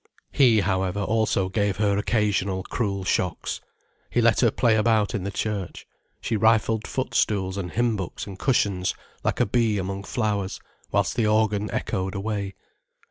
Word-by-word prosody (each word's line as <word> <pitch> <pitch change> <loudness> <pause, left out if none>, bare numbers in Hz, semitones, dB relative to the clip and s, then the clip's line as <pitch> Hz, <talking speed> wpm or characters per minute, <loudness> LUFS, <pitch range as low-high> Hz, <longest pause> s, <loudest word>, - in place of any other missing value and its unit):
He, 120 -7 +5
however, 95 +1 0
also 110 -3 +1
gave 100 +1 0
her 105 -1 +2
occasional 100 -3 0
cruel 100 -3 -2
shocks. 90 -2 -1 0.5
He - - 0
let 115 -1 +4
her 120 - +5
play 115 +1 +2
about 110 0 +2
in 100 -4 -2
the - - -1
church, 100 -2 -4 0.3
she 115 - -2
rifled 110 0 +2
foot 130 - -3
stools 95 -3 +1
and 95 -3 -4
hymn 120 -1 +1
books 95 -4 -5
and 95 -2 -9
cushions, 100 -8 +1 0.3
like - - 0
a - - +4
bee 110 0 +1
among 95 +1 -4
flowers, 105 -5 -1 0.3
whilst - - +1
the 115 -3 +2
organ 105 -1 +2
echoed 95 0 -2
away. 100 -1 -3
105 Hz, 160 wpm, -25 LUFS, 95-110 Hz, 0.5 s, He